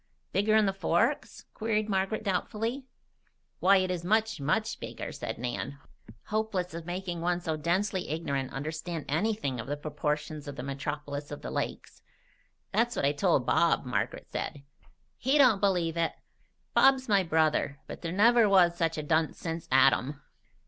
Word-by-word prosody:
"Bigger'n 215 +1 +4
the 195 - +1
Forks?" 195 - 0
queried 215 -1 0
Margaret 195 +2 -1
doubtfully. 225 +6 -2 0.7
"Why, 195 +2 +6
it 185 -1 +1
is 175 -2 -3
much, 220 0 +1
much 215 +11 0
bigger," - - -6
said - - -5
Nan, 125 +3 -4 0.5
hopeless 210 -5 -1
of 165 0 -7
making 175 -1 -4
one 175 +1 +1
so 165 -3 -2
densely 185 +4 -1
ignorant 140 -4 -2
understand 155 +3 -4
anything 155 - -1
of 115 - -6
the 145 +1 -2
proportions 150 0 -3
of 145 - -6
the 125 - -6
metropolis 145 +1 -4
of 145 - -8
the - - -5
lakes. - - -4 0.7
"That's 235 +3 +1
what - - 0
I 140 - +4
told 145 -3 +2
Bob," 170 -1 +3
Margaret 120 -5 -2
said. 140 - -5 0.5
"He 265 +4 +2
don't 245 -8 +5
believe 175 -5 +1
it. 165 0 +1 0.6
Bob's 265 -1 +5
my 200 -3 +4
brother, 155 -4 +1
but - - -9
there 165 - -3
never 225 +3 +5
was 180 -3 +5
such 165 -2 0
a 155 - -2
dunce 160 +1 +1
since 165 -1 -5
Adam." 135 +1 +4
170 Hz, 160 wpm, -29 LUFS, 150-205 Hz, 0.7 s, Why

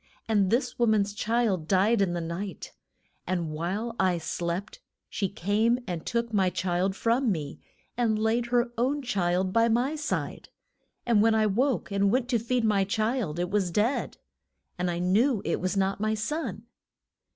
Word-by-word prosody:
And 205 -4 +2
this 245 +3 0
wo 240 - +3
man's 205 -2 +2
child 210 -6 0
died 200 +4 +3
in 185 -3 +1
the 175 - -2
night, 170 +4 -6 0.5
and 175 -4 -1
while 190 +9 -3
I 185 -2 +2
slept 170 - -4 0.3
she 195 - -2
came 210 +6 +1
and 175 -6 -4
took 235 -1 -2
my 190 -3 +3
child 185 +1 -1
from 235 +2 +1
me, 150 -6 -4 0.4
and 230 -3 +1
laid 225 +2 +1
her 240 0 +1
own 275 +4 0
child 185 -5 0
by 230 0 +4
my 245 +6 +1
side. 300 0 -3 0.6
And 230 -4 +4
when 225 0 +4
I 220 -1 +3
woke, 235 +3 0
and 200 0 +2
went 245 +3 +1
to 240 -3 +2
feed 240 +2 0
my 210 -3 +3
child, 215 -4 -1
it 175 +1 -2
was 200 -3 +1
dead. 210 +9 0 0.6
And 180 0 -1
I 170 - -2
knew 205 +7 +2
it 165 - -1
was 185 +2 -1
not 195 +1 0
my 215 0 +1
son. 300 +10 -3
210 Hz, 175 wpm, -27 LUFS, 185-235 Hz, 0.6 s, by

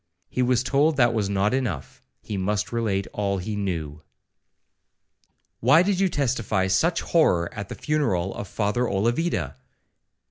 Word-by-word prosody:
He 125 - -1
was 125 0 +2
told 145 +3 +2
that 120 -3 +4
was 105 -3 0
not 100 +3 +1
enough, 120 - -3 0.2
he 105 - -5
must 100 +2 -1
relate 105 -5 -1
all 100 -1 -1
he 105 +3 -4
knew. 80 -7 -3 1.6
'Why 140 +9 +5
did 190 -1 0
you 195 -1 +3
testify 115 - 0
such 165 - +1
horror 90 - +2
at 105 -2 -6
the - - -6
funeral 100 - 0
of 100 - -6
Father 110 +5 0
Olavida?' 100 - 0
105 Hz, 145 wpm, -24 LUFS, 95-130 Hz, 1.6 s, Why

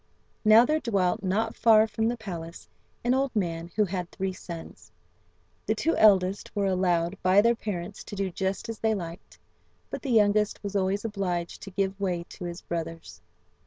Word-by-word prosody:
Now 220 +2 +7
there 310 +4 +1
dwelt, 200 -4 0
not 195 +4 0
far 220 -1 +6
from 220 +1 -1
the 240 +1 -1
palace, 170 -6 -7 0.4
an 240 +1 +2
old 265 -1 0
man 170 -4 -2
who 215 - +3
had 180 -2 -4
three 190 0 -3
sons. 170 -2 -10 0.8
The - - +2
two 330 - +1
eldest 195 -2 +4
were 200 -1 +1
allowed 180 -1 +1
by 185 +2 +5
their 230 +3 +5
parents 200 -4 -5
to - - -7
do 195 -1 -2
just 190 +2 -2
as 225 -1 -6
they 220 -1 +1
liked, 170 -2 -8 0.5
but - - -4
the 275 - -5
youngest 210 -2 +3
was 200 0 -5
always 195 +2 0
obliged 180 -5 -3
to 195 - -8
give 195 0 -2
way 180 -3 -1
to 180 - -8
his 175 +1 -6
brothers. 165 -1 -6
195 Hz, 180 wpm, -27 LUFS, 180-215 Hz, 0.8 s, Now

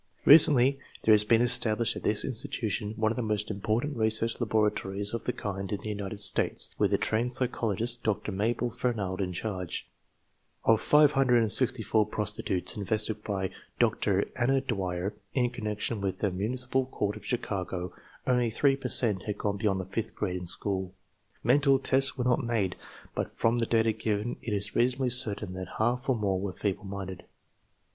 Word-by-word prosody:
Recently 140 -3 +9 0.2
there 110 - +5
has 105 0 +4
been 115 +2 +3
established 115 -2 +2
at - - -6
this 105 - -1
institution 110 -3 -4
one 110 -1 +1
of - - -3
the 125 - -2
most 105 -1 -2
important 110 +8 -2
research 110 +1 -1
laboratories 105 -2 0
of 115 - -4
the - - 0
kind 95 -2 -5
in 100 - -2
the 110 - -6
United 100 0 -5
States, - - +3
with - - +2
a - - +3
trained 120 +3 -1
psychologist, 120 -2 -1
Dr. 105 -1 -2
Mabel 115 +5 -1
Fernald, 105 -6 -3
in 90 -1 -2
charge. 90 -1 -5 0.8
Of 115 -1 +4
564 125 -6 +3
prostitutes 105 -3 -2
investigated 105 +1 -3
by 95 -2 -3 0.3
Dr. - - +1
Anna 135 +3 +1
Dwyer 95 -6 -3 0.2
in 125 -2 +1
connec 105 -3 -5
tion 115 -4 -2
with 95 -2 -2
the 100 -1 -1
Municipal 125 +7 -2
Court 105 -5 -3
of - - -11
Chicago, 95 -7 -4 0.3
only 125 -2 +1
3 135 +5 +2
per 130 -2 -5
cent 105 -8 +3
had 105 -1 -4
gone 100 -1 -2
beyond 100 -2 0
the 95 - -5
fifth 105 +4 -5
grade 90 -3 -3
in 90 -1 -7
school. 95 0 +4 0.5
Mental 135 +3 +4
tests 135 0 +3
were 125 - -1
not 125 +1 +1
made, 110 -6 -1 0.4
but - - -5
from 115 +1 +1
the 115 - -1
data 115 -1 +2
given 110 +1 -3
it 115 - -5
is 105 +1 -2
reasonably 125 +1 +1
certain 105 -5 -1
Uiat 95 -1 -8
half 120 +4 -1
or 130 - +3
more 100 -4 -1
were 100 -2 -4
feeble 100 +1 -3
minded. 95 -2 -7
110 Hz, 175 wpm, -28 LUFS, 100-120 Hz, 0.8 s, Recently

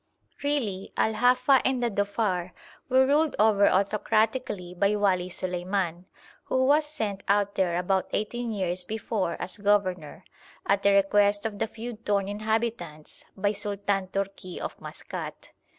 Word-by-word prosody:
Really 230 -10 -1
Al 220 - +2
Hafa 250 +4 +4
and 255 -2 0
the 235 - +1
Dhofar 200 -3 -1 0.4
were 260 +1 +5
ruled 295 +3 +2
over 210 -2 +5
autocratically 210 0 0
by 200 +3 +2
Wali 185 -3 +1
Suleiman, 180 -1 -2 0.4
who 260 0 +1
was 295 +2 +4
sent 215 -10 -3
out 200 0 +2
there 180 -3 +1
about 185 +1 0
eighteen 235 +3 -2
years 185 -3 -2
before 205 -2 -2
as 195 - -4
governor, 185 -6 0 0.4
at 200 0 +2
the 200 - +4
request 205 +1 +3
of 205 -2 -3
the 225 - 0
feud 230 0 -8
torn 200 -2 +1
inhabitants, 210 -7 -3
by 200 +1 +1
Sultan 200 -1 -2
Tourki 195 -1 -4
of - - -5
Maskat. - - -8
205 Hz, 140 wpm, -27 LUFS, 190-225 Hz, 0.4 s, were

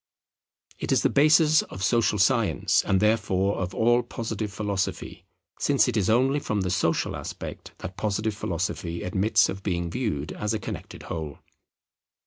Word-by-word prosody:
It - - -3
is - - +3
the - - +3
basis 155 +2 +5
of 95 - -8
social 115 -2 +2
science 115 +1 +2
and 95 - +2
therefore 100 -2 +1
of 95 +1 -3
all 120 +2 +3
Positive 110 -3 -4
Philosophy; 100 -1 -3 0.3
since - - +3
it - - -1
is 100 -4 +1
only 130 +5 +3
from 105 -7 -2
the 90 -1 -1
social 85 -2 0
aspect - - -7
that 95 - -8
Positive 110 +1 -1
Philosophy 90 -4 -3
admits 100 +3 +2
of 95 - -5
being 85 -3 -2
viewed 85 - -2
as 105 +1 -2
a - - -2
connected - - -7
whole. 80 -3 -5
105 Hz, 155 wpm, -26 LUFS, 95-115 Hz, 0.3 s, basis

